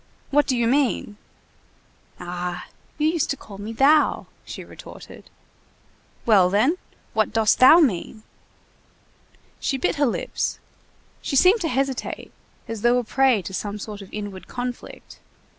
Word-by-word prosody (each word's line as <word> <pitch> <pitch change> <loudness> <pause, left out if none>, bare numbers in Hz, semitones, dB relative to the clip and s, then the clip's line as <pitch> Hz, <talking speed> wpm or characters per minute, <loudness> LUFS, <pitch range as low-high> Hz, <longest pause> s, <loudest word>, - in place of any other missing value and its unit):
"What 290 +1 +3
do 255 - +1
you 235 - +1
mean?" 250 -5 0 1.0
"Ah! 180 0 -5 0.3
you 305 0 +1
used 325 -1 0
to 280 - -1
call 200 -5 -12
me 210 +2 -6
thou," 280 +6 +3 0.2
she - - -8
retorted. - - -13 1.0
"Well, 195 -6 +5
then, 235 - +2 0.4
what 220 -1 +1
dost 220 -1 +2
thou 260 +6 +9
mean?" 220 - 0 1.4
She 270 - -1
bit 265 - -1
her 285 -1 +3
lips; 235 - -2 0.6
she - - -3
seemed 370 - +5
to 335 - 0
hesitate, 270 -1 -3 0.4
as 225 -2 -5
though 240 +2 +4
a 250 - 0
prey 255 -3 +2
to 190 - -7
some 205 +2 -4
sort 210 0 -8
of 195 - -12
inward 205 -3 -7
conflict. 245 0 -7
235 Hz, 140 wpm, -23 LUFS, 205-275 Hz, 1.4 s, thou